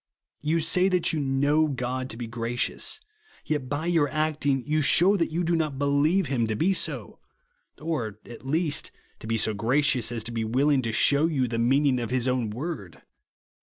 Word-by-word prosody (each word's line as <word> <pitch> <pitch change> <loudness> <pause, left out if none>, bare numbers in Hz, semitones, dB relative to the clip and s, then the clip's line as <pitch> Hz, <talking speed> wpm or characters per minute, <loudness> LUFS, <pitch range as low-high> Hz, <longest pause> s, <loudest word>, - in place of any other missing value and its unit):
You 160 +3 0
say 180 +4 +2
that 180 -3 +1
you 155 - -1
know 145 +3 +2
God 130 -1 -3
to 110 - -7
be 120 - -5
gra 115 +1 -5
cious, 115 - 0 0.5
yet, 145 -4 -2
by 145 +3 -3
your 165 -4 +2
acting, 150 -3 -1
you 155 +1 +1
shew 180 +7 +5
that 165 - 0
you 170 +3 -1
do 170 0 +1
not 155 -4 -1
believe 145 +7 +2
him 125 -5 -1
to 110 - -2
be 180 - +1
so; - - -2 0.6
or, 130 -10 -3
at 120 - -11
least, 150 +2 0 0.3
to - - -9
be 115 0 0
so 110 0 +1
gracious 125 +3 +1
as 115 -2 -2
to 115 - -6
be 115 -1 -2
willing 135 +5 +2
to 115 -2 -3
shew 140 +7 +3
you 135 -6 0
the 115 -1 -3
meaning 130 +2 +2
of 120 - -4
his 125 0 0
own 125 -3 0
word. 110 - -6
140 Hz, 200 wpm, -26 LUFS, 120-155 Hz, 0.6 s, shew